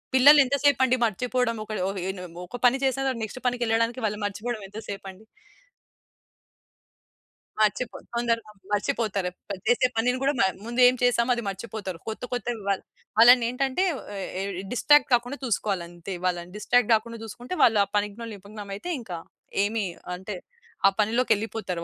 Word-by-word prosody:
పిల్లలు 285 +3 +8
ఎంత 275 - 0
సేపండి 260 -2 +4
మర్చిపోవడం 245 +2 0
ఒకళ్ళ 215 -3 -4 0.2
హె 180 - -3
ఉన 190 -1 -9 0.3
ఒక 245 - -6
పని 245 +2 +5
చేసిన 270 0 +1
తర్వాత 255 -3 -1
నెక్స్ట్ 220 +4 -6
పనికెళ్ళడానికి 235 0 +1
వాళ్ళు 210 0 -2
మర్చిపోవడం 215 +3 -3
ఎంత 210 +2 -7
సేపండి. 195 0 -7 2.4
మర్చిపో 215 +3 +1 0.2
తొందరగా 230 -2 -1 0.2
మర్చిపోతారు. 205 -3 0 0.2
ప - - -3 0.2
చేసే 245 +1 +4
పనిని 250 +3 +2
గూడా 280 - +2
మ - - +5 0.2
ముందు 240 +2 -3
ఏం 250 - +4
చేసామో 245 0 +3
అది 235 - -4
మర్చిపోతారు. 195 -3 -6
కొత్త, 220 +2 -5
కొత్తవి 240 -1 -3
వాళ్ళ 195 - +1 0.4
వాళ్ళనేంటంటే 250 +7 +5 0.3
ఏ - - -4 0.2
ఏ - - -2 0.3
డిస్ట్రాక్ట్ 295 +4 +5
కాకుండా 245 +4 +1
చూసుకోవాలంతే. 185 -5 -3
వాళ్ళని 175 0 -2
డిస్ట్రాక్ట్ 240 +2 +2
గాకుండా 230 +1 0
జూసుకుంటే, 245 - -6
వాళ్ళు 225 -4 +5
ఆ - - -23
పనిలో 210 +3 -3
నిమగ్నమైతే 205 - -7
ఇంకా 190 -8 -6 0.5
ఏమి 215 -1 -1 0.3
అంటే 190 +2 -6 0.5
ఆ - - -6
పనిలోకెళ్ళిపోతారు 220 -5 0
225 Hz, 145 wpm, -26 LUFS, 205-245 Hz, 2.4 s, పిల్లలు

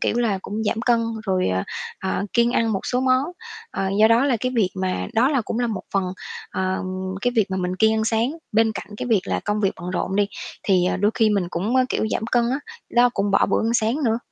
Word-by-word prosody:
kiểu - - 0
là, 215 -5 +1
cũng 215 +2 -4
giảm 220 +2 0
cân 240 -1 +3 0.3
rồi, 185 - +1
ờ, 95 0 0 0.4
ờ, 190 +1 -1
kiêng 235 0 +3
ăn 225 -1 +2
một 195 - -1
số 250 - 0
món. 255 +1 +3 0.5
Ờ, 195 0 -2
do 220 - +7
đó 235 +4 +4
là 265 -4 +2
cái 255 0 -1
việc 190 -5 +3
mà 185 - -1
đó 250 +4 +4
là 275 -4 +2
cũng 225 - -3
là 245 - +1
một 210 -5 -3
phần, 195 - +3 0.5
ờ, 185 0 -1 0.4
cái 245 - +1
việc 215 -3 +4
mà 190 - -1
mình 180 0 -2
kiêng 220 +1 +4
ăn 220 0 0
sáng. 225 +3 +1 0.2
Bên 220 0 +3
cạnh 200 - -6
cái 250 - -4
việc 215 -5 +4
là - - -1
công 210 0 0
việc 195 -2 +2
bận 180 +1 -5
rộn 190 +1 -2
đi 205 -1 +3 0.4
thì, 185 -3 +3
ờ, - - -1
đôi 205 +3 +2
khi 220 -1 +3
mình 195 -4 +1
cũng, 210 +10 -1
ơ, 255 - +5
kiểu, 220 - 0
giảm - - -1
cân 240 -1 +3
á, 270 - 0 0.4
đó 245 +1 +7
cũng 200 0 0
bỏ 195 - +4
bữa - - +1
ăn 235 - 0
sáng 235 +7 +1
nữa. 225 0 +2
220 Hz, 260 wpm, -23 LUFS, 195-235 Hz, 0.5 s, do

